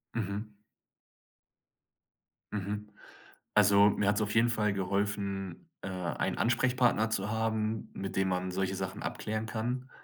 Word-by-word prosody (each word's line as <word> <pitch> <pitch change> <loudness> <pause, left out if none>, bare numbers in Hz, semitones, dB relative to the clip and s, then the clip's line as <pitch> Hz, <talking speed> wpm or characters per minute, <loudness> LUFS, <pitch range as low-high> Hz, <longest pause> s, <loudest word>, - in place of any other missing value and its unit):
Mhm. 105 0 -3 2.0
Mhm. 105 +1 -3 0.7
Also, 100 0 +7
mir 105 -1 +1
hat's 105 +1 +3
auf 105 0 -1
jeden 115 +1 +5
Fall 105 -3 +1
geholfen, 100 -1 -2
äh, - - -5
einen 90 -4 -2
Ansprechpartner 120 -1 +3
zu 100 -2 -1
haben, 110 -1 -1
mit 95 0 -5
dem 95 0 +2
man 90 0 -1
solche 95 +1 -1
Sachen 95 +2 -4
abklären 110 0 -3
kann, 120 +4 -3
105 Hz, 125 wpm, -31 LUFS, 95-110 Hz, 2.0 s, Also